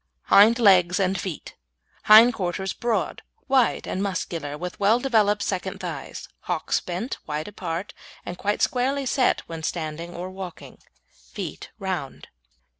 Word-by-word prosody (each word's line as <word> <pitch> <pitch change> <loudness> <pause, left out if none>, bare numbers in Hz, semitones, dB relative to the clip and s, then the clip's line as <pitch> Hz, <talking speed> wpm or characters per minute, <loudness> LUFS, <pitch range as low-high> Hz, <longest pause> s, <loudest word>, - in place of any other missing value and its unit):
HIND 220 +4 +7
LEGS 185 -6 +5
AND 190 -1 +1
FEET 180 -6 -6 0.5
Hind 225 +3 +8
quarters 190 -1 -3
broad, 235 -2 -2 0.3
wide, 265 -3 +2
and 190 - -2
muscular, 170 -6 -3
with 180 +2 -6
well 215 +4 +4
developed 215 -5 +2
second 185 -2 -3
thighs, - - -6
hocks - - -1
bent, 185 +9 -5
wide 150 +1 -3
apart, 180 -2 -5 0.3
and 175 - -5
quite 205 +3 -1
squarely 270 +2 0
set 255 0 +2
when 165 -1 -8
standing 165 +1 -4
or 180 +2 -6
walking. 185 -2 -9 0.5
Feet - - -6
round. - - -5
190 Hz, 135 wpm, -24 LUFS, 175-225 Hz, 0.5 s, Hind